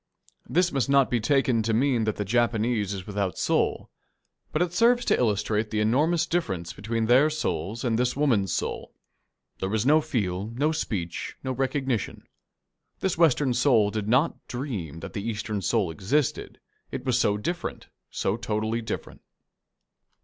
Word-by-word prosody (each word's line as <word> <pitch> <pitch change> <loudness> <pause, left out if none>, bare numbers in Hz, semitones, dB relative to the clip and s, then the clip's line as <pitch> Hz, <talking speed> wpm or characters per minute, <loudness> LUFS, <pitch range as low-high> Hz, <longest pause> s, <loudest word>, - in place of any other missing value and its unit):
This 175 +1 +2
must 135 -1 0
not 140 -1 +4
be 120 - +2
taken 125 -1 +2
to 110 0 0
mean 125 -2 +2
that 110 - 0
the 105 - -3
Japanese 115 -1 +1
is 95 -2 -5
without 100 -4 -2
soul. - - 0 0.6
But 155 - +2
it 175 -1 -4
serves 240 +4 +3
to - - +3
illustrate 105 -1 0
the 110 - -1
enormous 150 +10 +2
difference 95 - -2
between 115 +3 -2
their 130 +6 +5
souls 110 - -3
and 115 -2 +1
this 125 0 +1
woman's 120 -10 +2
soul. - - -3 0.6
There 95 - -2
was 110 +2 0
no 155 +3 +5
feel, 100 -8 -2
no 145 +5 +1
speech, 100 - -3
no 130 - -2
recognition. 130 -2 -2 0.8
This 190 - 0
Western 150 -5 +3
soul 120 -5 +3
did 105 -1 -3
not 130 +9 +1
dream 105 - -5
that - - -8
the 100 - -3
Eastern 105 -1 -3
soul 100 -3 +1
existed, 120 - -1 0.3
it 130 0 -6
was 125 -1 +2
so 105 -4 +2
different, 175 +12 -4 0.2
so 95 - -1
totally 110 +1 -2
different. 110 -1 -6
115 Hz, 160 wpm, -26 LUFS, 105-140 Hz, 0.8 s, their